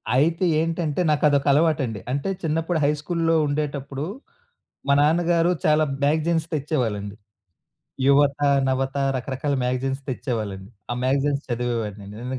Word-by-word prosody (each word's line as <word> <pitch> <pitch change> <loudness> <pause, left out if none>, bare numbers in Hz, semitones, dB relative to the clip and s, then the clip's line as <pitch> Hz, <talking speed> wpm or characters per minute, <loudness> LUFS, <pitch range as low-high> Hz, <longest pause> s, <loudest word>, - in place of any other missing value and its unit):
అయితే 165 +7 +2
ఏంటంటే 165 -1 -1
నాకదొక 145 -2 +2
అలవాటండి. 145 -8 +1
అంటే 140 +8 -1
చిన్నప్పుడు 165 +1 0
హై 145 - +4
స్కూల్లో 165 0 0
ఉండేటప్పుడు, 145 -1 -3 0.8
మా 140 - +4
నాన్నగారు 170 +2 +3
చాలా 155 0 +4 0.2
మ్యాగజైన్స్ 160 +2 +1
తెచ్చేవాళ్ళండి. 115 -9 -2 0.9
యువత, 140 0 +4 0.3
నవత 130 +1 -1 0.2
రకరకాల 135 +2 -2
మ్యాగజైన్స్ 135 +2 -1
తెచ్చేవాళ్ళండి. 105 -6 -4 0.2
ఆ - - -1
మ్యాగజైన్స్ 140 +2 +1
చదివేవాడిని. 115 -4 -3
నేను 125 +2 -4
140 Hz, 110 wpm, -23 LUFS, 130-155 Hz, 0.9 s, హై